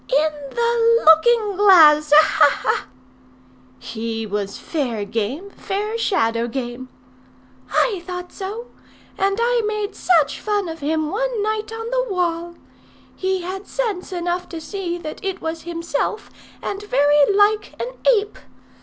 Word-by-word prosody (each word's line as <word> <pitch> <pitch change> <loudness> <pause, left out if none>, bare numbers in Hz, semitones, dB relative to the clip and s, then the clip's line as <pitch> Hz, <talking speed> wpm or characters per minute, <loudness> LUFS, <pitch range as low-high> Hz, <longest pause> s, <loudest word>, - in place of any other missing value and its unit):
"In 305 +4 +2 0.2
the 465 - +2
looking 410 +6 +5
glass. 310 -7 +6
Ha! 305 +1 +8 0.2
ha! - - -2
ha!" - - 0 0.9
"He 225 0 -5
was 200 -1 -4
fair 245 -10 -3
game; 240 - -4
fair 415 +4 -4
shadow 230 - 0
game." 245 0 -5 0.8
"I 400 -7 +1
thought 360 -1 -6
so. 425 +5 -7 0.4
And 395 +1 0
I 475 0 +2
made 425 -1 -3
such 325 -6 +2
fun 415 -3 -1
of 325 0 -7
him 310 +1 -1
one 475 0 -1
night 430 0 -2
on 450 +1 -6
the - - -1
wall! 345 -2 -2 0.6
He 375 0 -1
had 380 +3 -6
sense 425 -7 -3
enough 355 0 -3
to 335 - -6
see 350 +1 -4
that 310 +1 -8
it 385 -1 -3
was 325 0 -4
himself, 335 +4 -3 0.3
and 400 0 -4
very 290 -4 +3
like 415 +1 +2
an - - -3 0.3
ape. 410 0 -4
360 Hz, 140 wpm, -21 LUFS, 300-420 Hz, 0.9 s, Ha